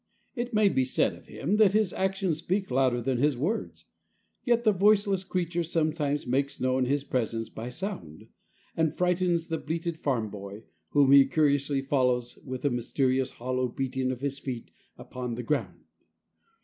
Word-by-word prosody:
It 245 Hz, -2 st, -3 dB
may 215 Hz, -2 st, +4 dB
be 130 Hz, -9 st, +2 dB
said 130 Hz, -, +1 dB
of -, -, -15 dB
him 190 Hz, +9 st, -1 dB
that 210 Hz, -3 st, +5 dB
his 215 Hz, -3 st, +2 dB
actions 190 Hz, -4 st, -1 dB
speak 190 Hz, 0 st, -2 dB
louder 125 Hz, -2 st, +2 dB
than 130 Hz, -1 st, 0 dB
his 145 Hz, -1 st, +2 dB
words. 180 Hz, -, -3 dB, 0.6 s
Yet 235 Hz, -2 st, +2 dB
the 215 Hz, -, +5 dB
voiceless 200 Hz, -1 st, +3 dB
creature 175 Hz, -2 st, -1 dB
sometimes 155 Hz, -3 st, -1 dB
makes 135 Hz, +3 st, -1 dB
known 130 Hz, 0 st, +1 dB
his 140 Hz, +2 st, 0 dB
presence 115 Hz, -4 st, -2 dB
by 115 Hz, +2 st, -6 dB
sound, 145 Hz, -, -7 dB, 0.5 s
and 160 Hz, -2 st, 0 dB
frightens 180 Hz, -2 st, +1 dB
the 165 Hz, -1 st, -3 dB
belated 165 Hz, +1 st, -3 dB
farm 115 Hz, -7 st, -1 dB
boy, 100 Hz, +1 st, -8 dB, 0.3 s
whom 140 Hz, -2 st, +4 dB
he 140 Hz, -1 st, +8 dB
curiously 145 Hz, -2 st, +1 dB
follows 125 Hz, -3 st, 0 dB
with 130 Hz, 0 st, -6 dB
a 140 Hz, -, +3 dB
mysterious, 130 Hz, +2 st, 0 dB
hollow 130 Hz, +1 st, -2 dB
beating 130 Hz, +1 st, -2 dB
of 130 Hz, -1 st, -4 dB
his 140 Hz, -1 st, -3 dB
feet 125 Hz, -4 st, -6 dB, 0.3 s
upon 125 Hz, -2 st, -5 dB
the 125 Hz, -, -5 dB
ground. 150 Hz, +5 st, -2 dB
140 Hz, 165 wpm, -28 LUFS, 130-175 Hz, 0.6 s, he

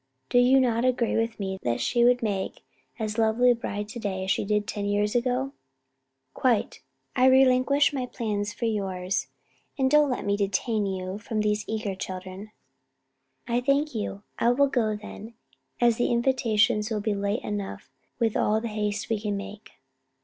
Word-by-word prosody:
Do 245 Hz, -, +4 dB
you 255 Hz, +2 st, +5 dB
not 240 Hz, -2 st, +2 dB
agree 250 Hz, -2 st, +1 dB
with 225 Hz, 0 st, -1 dB
me 190 Hz, -1 st, -3 dB
that 120 Hz, -1 st, -1 dB
she 240 Hz, -1 st, +2 dB
would 245 Hz, 0 st, +4 dB
make 195 Hz, -3 st, -3 dB, 0.3 s
as 220 Hz, 0 st, -3 dB
lovely 225 Hz, +3 st, +4 dB
a -, -, +3 dB
bride 205 Hz, -2 st, -4 dB
to 240 Hz, +2 st, -7 dB
day 190 Hz, -3 st, -3 dB
as 190 Hz, -, 0 dB
she -, -, +1 dB
did 210 Hz, 0 st, 0 dB
ten 205 Hz, -1 st, -4 dB
years 205 Hz, +1 st, +1 dB
ago?" 255 Hz, +2 st, 0 dB, 0.8 s
"Quite. 245 Hz, -5 st, 0 dB, 0.3 s
I 255 Hz, -1 st, +5 dB
relinquish 260 Hz, +2 st, +4 dB
my 255 Hz, -3 st, -2 dB
plan 215 Hz, -5 st, -2 dB
for 210 Hz, +3 st, -4 dB
yours; 190 Hz, -4 st, -1 dB, 0.5 s
and 265 Hz, -1 st, +2 dB
don't 300 Hz, -1 st, +5 dB
let 250 Hz, -, -2 dB
me 200 Hz, 0 st, +1 dB
detain 205 Hz, +2 st, 0 dB
you 190 Hz, +1 st, -4 dB
and 215 Hz, -2 st, 0 dB
these 210 Hz, 0 st, 0 dB
eager 215 Hz, -2 st, -2 dB
children." 190 Hz, +2 st, -7 dB, 1.0 s
"I 240 Hz, 0 st, +1 dB
thank 280 Hz, +3 st, +1 dB
you: 205 Hz, -2 st, -4 dB, 0.2 s
I 235 Hz, -, +3 dB
will 270 Hz, +4 st, +4 dB
go 235 Hz, -6 st, 0 dB
then, 215 Hz, +2 st, -10 dB, 0.4 s
as 235 Hz, -2 st, +3 dB
the 245 Hz, -, +1 dB
invitations 235 Hz, -3 st, +2 dB
will 215 Hz, -2 st, -2 dB
be 215 Hz, 0 st, 0 dB
late 200 Hz, +3 st, -2 dB
enough 205 Hz, -2 st, -5 dB, 0.3 s
with 225 Hz, -3 st, 0 dB
all 215 Hz, +1 st, +2 dB
the 230 Hz, +1 st, -4 dB
haste 210 Hz, -1 st, -2 dB
we 220 Hz, -2 st, -1 dB
can 205 Hz, -2 st, -2 dB
make." 205 Hz, +1 st, -9 dB
220 Hz, 180 wpm, -26 LUFS, 205-245 Hz, 1.0 s, you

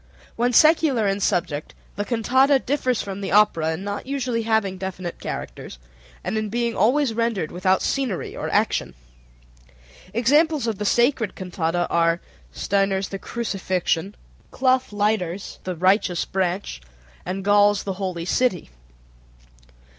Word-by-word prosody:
When 240 Hz, +2 st, +1 dB
secular 300 Hz, -5 st, +4 dB
in 195 Hz, 0 st, 0 dB
subject 165 Hz, -6 st, -1 dB, 0.2 s
the 205 Hz, -, -2 dB
cantata 260 Hz, +5 st, +3 dB
differs 260 Hz, -3 st, -1 dB
from 200 Hz, -1 st, -6 dB
the 195 Hz, -, -4 dB
opera 165 Hz, -6 st, +3 dB
in 170 Hz, +4 st, -6 dB
not 205 Hz, +4 st, -5 dB
usually 255 Hz, -4 st, -1 dB
having 220 Hz, -4 st, 0 dB
definite 185 Hz, -2 st, -5 dB
characters, -, -, -6 dB, 0.5 s
and 220 Hz, -, -1 dB
in 215 Hz, -1 st, -3 dB
being 235 Hz, +1 st, -1 dB
always 250 Hz, +4 st, +2 dB
rendered 225 Hz, -8 st, -1 dB
without 185 Hz, +1 st, +1 dB
scenery 260 Hz, -9 st, -2 dB
or -, -, -4 dB
action. -, -, 0 dB, 1.2 s
Examples 290 Hz, -, +2 dB
of 220 Hz, -4 st, -2 dB
the 210 Hz, -, -2 dB
sacred 240 Hz, -1 st, +2 dB
cantata 175 Hz, -2 st, -1 dB
are: 165 Hz, 0 st, +2 dB, 0.3 s
Stainer's 195 Hz, -1 st, 0 dB
"The 195 Hz, -, -5 dB
Crucifixion," 195 Hz, -4 st, -2 dB, 0.3 s
Clough 260 Hz, -1 st, +2 dB
Leighter's 205 Hz, -3 st, -2 dB
"The 185 Hz, -1 st, -3 dB
Righteous 185 Hz, 0 st, +2 dB
Branch," 185 Hz, -, -2 dB, 0.4 s
and 190 Hz, +2 st, -4 dB
Gaul's 205 Hz, 0 st, +4 dB
"The 195 Hz, -, -3 dB
Holy 180 Hz, -3 st, -3 dB
City." 185 Hz, -, 0 dB
205 Hz, 130 wpm, -23 LUFS, 185-235 Hz, 1.2 s, secular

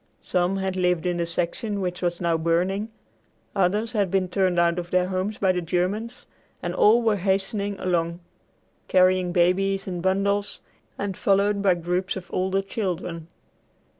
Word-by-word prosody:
Some 180 Hz, +1 st, 0 dB
had 190 Hz, -1 st, -2 dB
lived 180 Hz, -2 st, +1 dB
in 175 Hz, -1 st, 0 dB
the 170 Hz, -1 st, -1 dB
section 180 Hz, +5 st, -2 dB
which 180 Hz, -1 st, -3 dB
was 175 Hz, -1 st, -1 dB
now 170 Hz, -2 st, +1 dB
burning; 180 Hz, +6 st, 0 dB, 0.7 s
others 205 Hz, +4 st, +1 dB
had 205 Hz, -5 st, +1 dB
been 185 Hz, 0 st, 0 dB
turned 185 Hz, -1 st, +1 dB
out 170 Hz, 0 st, +2 dB
of 175 Hz, 0 st, -6 dB
their 180 Hz, 0 st, +1 dB
homes 190 Hz, +3 st, -2 dB
by 190 Hz, -2 st, +3 dB
the 180 Hz, -1 st, -1 dB
Germans; 195 Hz, +8 st, -2 dB, 0.4 s
and -, -, -2 dB
all 230 Hz, +3 st, +5 dB
were 220 Hz, -2 st, +2 dB
hastening 195 Hz, +1 st, -1 dB
along, 170 Hz, -2 st, -1 dB, 0.7 s
carrying 185 Hz, -1 st, +3 dB
babies 190 Hz, +2 st, +2 dB
and 180 Hz, -2 st, -4 dB
bundles, 200 Hz, +2 st, 0 dB, 0.4 s
and 200 Hz, -2 st, -3 dB
followed 200 Hz, +1 st, +2 dB
by 190 Hz, -3 st, +4 dB
groups 180 Hz, +3 st, -2 dB
of 185 Hz, -2 st, -8 dB
older 190 Hz, +1 st, 0 dB
children. 180 Hz, -5 st, -4 dB
185 Hz, 160 wpm, -24 LUFS, 175-200 Hz, 0.7 s, all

